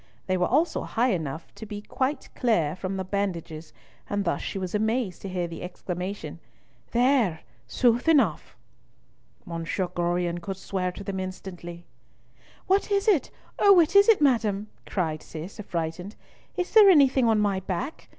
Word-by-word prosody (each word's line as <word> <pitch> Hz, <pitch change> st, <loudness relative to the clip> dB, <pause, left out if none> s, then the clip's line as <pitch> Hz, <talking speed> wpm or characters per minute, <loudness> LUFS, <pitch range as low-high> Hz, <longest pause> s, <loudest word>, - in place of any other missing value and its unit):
They 185 Hz, -, 0 dB
were 180 Hz, -1 st, +1 dB
also 310 Hz, +6 st, +1 dB
high 240 Hz, +2 st, 0 dB
enough 160 Hz, -3 st, -3 dB
up -, -, -31 dB
to 220 Hz, -, -9 dB
be 205 Hz, -1 st, -7 dB
quite 265 Hz, +6 st, -2 dB
clear 175 Hz, -11 st, +1 dB
from 190 Hz, +1 st, -4 dB
the 190 Hz, -, -2 dB
bandages, 180 Hz, -5 st, -4 dB, 0.4 s
and 205 Hz, -1 st, -1 dB
thus 170 Hz, -, 0 dB
she -, -, -4 dB
was 185 Hz, -2 st, -4 dB
amazed 220 Hz, -2 st, -1 dB
to 195 Hz, -, -6 dB
hear 180 Hz, -2 st, -2 dB
the 165 Hz, -, -8 dB
exclamation, 180 Hz, -2 st, -5 dB, 0.5 s
"There! 240 Hz, -, +2 dB, 0.3 s
sooth 245 Hz, +4 st, +2 dB
enough." 305 Hz, -4 st, +2 dB, 0.9 s
"Monsieur 165 Hz, +2 st, -2 dB
Gorion 175 Hz, 0 st, -1 dB
could 190 Hz, +2 st, -5 dB
swear 185 Hz, -1 st, -2 dB
to 200 Hz, -, -9 dB
them 195 Hz, -1 st, -4 dB
instantly." 175 Hz, -2 st, -7 dB, 0.8 s
"What 390 Hz, +2 st, +2 dB
is 400 Hz, +1 st, +1 dB
it? 380 Hz, -10 st, +3 dB, 0.3 s
Oh, 400 Hz, -1 st, +7 dB
what 345 Hz, -1 st, +4 dB
is 400 Hz, +2 st, +7 dB
it, 435 Hz, -8 st, +5 dB
madam?" 215 Hz, -6 st, +1 dB, 0.2 s
cried 160 Hz, -5 st, -2 dB
Cis, 165 Hz, +6 st, -9 dB
affrighted; 180 Hz, +1 st, -4 dB, 0.4 s
"is 360 Hz, 0 st, -2 dB
there 425 Hz, -2 st, +9 dB
anything 270 Hz, -7 st, +5 dB
on 220 Hz, -1 st, +3 dB
my 200 Hz, -2 st, +1 dB
back? 190 Hz, -, -5 dB
195 Hz, 160 wpm, -26 LUFS, 175-250 Hz, 0.9 s, there